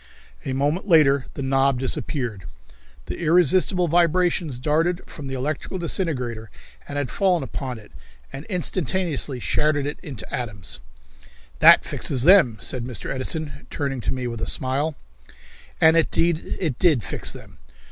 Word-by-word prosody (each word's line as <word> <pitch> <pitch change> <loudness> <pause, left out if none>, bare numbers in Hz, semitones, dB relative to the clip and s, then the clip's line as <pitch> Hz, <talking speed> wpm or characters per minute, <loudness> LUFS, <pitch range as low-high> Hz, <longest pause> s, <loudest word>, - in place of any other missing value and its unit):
A 135 - -2
moment 145 +9 -1
later 140 -6 +4
the 140 - -4
knob 135 0 +2
disappeared. 125 - -3 0.6
The - - -6
irresistible 175 +2 +3
vibrations 170 -3 +2
darted 160 +7 0
from 145 -3 -9
the 135 - -4
electrical 150 +7 -3
disintegrator 130 - -2 0.4
and 145 - -5
had 145 -4 -2
fallen 180 -5 +1
upon 130 -2 -5
it 105 -1 -15 0.4
and 135 - -6
instantaneously 175 - -2
shattered 150 +2 +1
it 145 - -4
into 130 -11 -8
atoms. 105 -8 -5 0.8
"That - - +7
fixes 130 -3 -1
them," 170 - +6
said 125 +3 -1
Mr. 125 +1 -5
Edison, 145 +2 -3
turning 135 -3 -3
to - - -1
me 130 -1 -4
with 115 -2 -5
a - - -2
smile. 140 +4 0 0.8
And 160 0 +6
indeed 165 0 +1
it 155 -9 -2
did 155 - +3
fix - - -1
them. - - -12
145 Hz, 145 wpm, -23 LUFS, 130-170 Hz, 0.8 s, That